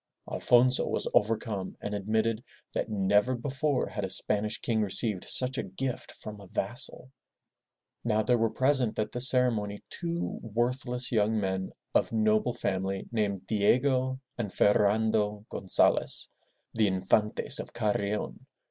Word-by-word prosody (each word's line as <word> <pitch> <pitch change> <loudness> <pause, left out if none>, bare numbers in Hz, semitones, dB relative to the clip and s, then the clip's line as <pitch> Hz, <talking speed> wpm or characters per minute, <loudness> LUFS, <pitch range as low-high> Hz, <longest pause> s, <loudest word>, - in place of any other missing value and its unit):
Alfonso 125 +1 +3
was - - -2
overcome 105 -3 0
and 105 - -5
admitted 110 +3 -1 0.3
that - - -2
never 105 +4 +2
before 135 +2 -1
had 105 0 -5
a 95 - -2
Spanish 105 +3 +2
king 110 -2 0
received 105 -1 0
such 130 +1 +2
a - - -1
gift 130 -2 -5
from 105 -1 -9
a 100 - -12
vassal. 120 +6 -2 0.9
Now 110 -2 +1
there 120 +1 +2
were 115 0 +2
present 130 0 +1
at 110 - -1
this 125 +2 +5
ceremony 110 -5 0
two 170 0 -3
worthless 125 +3 -2
young 110 -1 +2
men 95 -1 -2 0.2
of - - +2
noble 110 +2 +1
family 95 0 -2
named 100 -4 -1
Di 105 0 -1
e'go 130 0 0 0.2
and 105 -5 -3
Fer 105 - +4
ran'do 105 0 +1
Gon 95 - -6
za'les, - - +3 0.4
the 110 -2 +2
In 95 -1 -1
fan'tes 105 +2 +2
of - - -6
Carrion. 105 -2 -2
110 Hz, 150 wpm, -29 LUFS, 105-125 Hz, 0.9 s, this